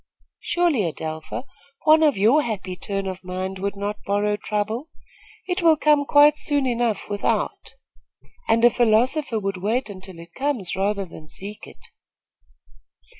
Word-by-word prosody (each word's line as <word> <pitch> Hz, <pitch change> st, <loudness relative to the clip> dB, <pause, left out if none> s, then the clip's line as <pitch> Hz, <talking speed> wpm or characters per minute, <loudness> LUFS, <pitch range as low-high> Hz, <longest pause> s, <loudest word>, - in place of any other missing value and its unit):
"Surely, 345 Hz, -9 st, +1 dB
Adelpha, 155 Hz, +7 st, -6 dB, 0.4 s
one 310 Hz, +1 st, +6 dB
of 300 Hz, -6 st, +3 dB
your 230 Hz, +10 st, +4 dB
happy 195 Hz, -7 st, -4 dB
turn 195 Hz, +1 st, -4 dB
of 190 Hz, -1 st, -5 dB
mind 185 Hz, +1 st, -4 dB
would 200 Hz, +1 st, -2 dB
not 205 Hz, +1 st, -4 dB
borrow 205 Hz, +1 st, 0 dB
trouble. 215 Hz, +7 st, -3 dB, 0.6 s
It 365 Hz, +1 st, -1 dB
will 325 Hz, -2 st, +5 dB
come 295 Hz, -1 st, +3 dB
quite 295 Hz, +1 st, +6 dB
soon 285 Hz, -2 st, 0 dB
enough 235 Hz, -4 st, -1 dB
without, 205 Hz, -1 st, -2 dB, 0.7 s
and 230 Hz, +1 st, +4 dB
a 240 Hz, -, +7 dB
philosopher 240 Hz, +3 st, +2 dB
would 195 Hz, -2 st, -2 dB
wait 220 Hz, +5 st, -1 dB
until 190 Hz, -2 st, -10 dB
it 170 Hz, +1 st, -13 dB
comes 265 Hz, -8 st, -2 dB
rather 200 Hz, +1 st, -1 dB
than 155 Hz, -3 st, -13 dB
seek 205 Hz, +5 st, -7 dB
it." -, -, -16 dB
210 Hz, 145 wpm, -23 LUFS, 195-275 Hz, 0.7 s, a